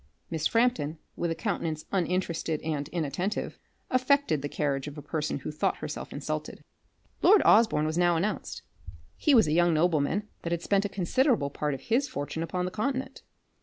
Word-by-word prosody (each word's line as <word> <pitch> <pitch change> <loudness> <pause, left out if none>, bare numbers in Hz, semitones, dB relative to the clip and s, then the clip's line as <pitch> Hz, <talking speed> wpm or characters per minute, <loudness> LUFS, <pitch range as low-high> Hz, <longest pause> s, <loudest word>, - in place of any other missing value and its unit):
Miss 160 -2 +1
Frampton, 230 -10 +1 0.2
with 170 - -1
a 165 - -1
countenance 165 -7 -3
uninterested 175 -4 -1
and 150 -3 -2
inattentive, 170 +5 -3 0.3
affected 255 - +2
the 145 - -3
carriage 140 -2 -1
of 150 +1 -8
a - - -6
person 150 -3 -2
who 140 - -5
thought 150 - 0
herself - - -6
insulted. - - -5 0.6
Lord 410 +1 +6
Osborne 215 -9 +5
was 160 +2 -1
now 175 -1 +4
announced. 190 +6 -2 0.5
He 295 -4 +3
was 225 - +6
a - - 0
young 175 0 +4
nobleman, 165 +4 +1
that 170 - -4
had 170 0 -1
spent 200 0 +2
a - - -1
considerable 195 - +1
part 150 -1 -2
of 135 - -10
his 250 - +1
fortune 145 - -4
upon 180 +2 -2
the 180 - -3
continent. 260 +5 -3
170 Hz, 175 wpm, -28 LUFS, 155-215 Hz, 0.6 s, Lord